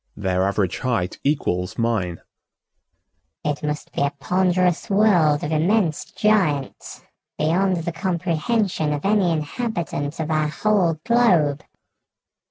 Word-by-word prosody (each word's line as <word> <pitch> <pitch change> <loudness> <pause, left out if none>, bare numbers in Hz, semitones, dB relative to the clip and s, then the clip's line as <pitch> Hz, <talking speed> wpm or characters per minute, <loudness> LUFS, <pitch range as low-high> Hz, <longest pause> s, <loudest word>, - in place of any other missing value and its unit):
"Their 95 -1 0
average 100 -3 -1
height 115 -8 -2
equals 90 -11 -1
mine." 110 -7 -1 1.2
"It 150 -1 -1
must 150 0 -4
be - - -2
a 140 - +2
ponderous 180 +5 0
world 180 -8 +3
of 150 - -3
immense 165 +1 +1
giants 180 -11 -1 0.3
beyond 175 +2 +1
the 170 - -2
comprehension 175 -1 -1
of 145 +3 -4
any 200 -3 +3
inhabitant 160 - -3
of 160 0 -2
our 155 -1 +1
whole 170 0 +1
globe." 175 -12 +3
160 Hz, 115 wpm, -22 LUFS, 145-190 Hz, 1.2 s, world